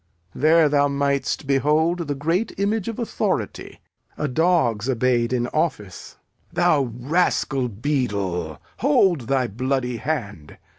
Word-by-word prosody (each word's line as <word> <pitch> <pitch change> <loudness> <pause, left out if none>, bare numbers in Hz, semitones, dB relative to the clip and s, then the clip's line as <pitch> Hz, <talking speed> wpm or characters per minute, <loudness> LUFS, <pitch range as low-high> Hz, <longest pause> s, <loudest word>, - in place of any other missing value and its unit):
There 160 +2 +4
thou 145 -1 +3
mightst 140 +1 -1
behold 155 +5 +1
the 145 - -2
great 165 +10 -1
image 200 +1 -1
of 230 - -4
authority: 235 - -3 0.4
a 150 - -1
dog's 130 - +1
obeyed 120 -1 +1
in 120 -2 0
office. 150 - -3 0.3
Thou 135 -4 +2
rascal 135 -2 0
beadle, 100 - -2 0.2
hold 195 - +2
thy 135 -2 +1
bloody 125 +2 -2
hand! 105 - -5
140 Hz, 115 wpm, -22 LUFS, 120-160 Hz, 0.4 s, There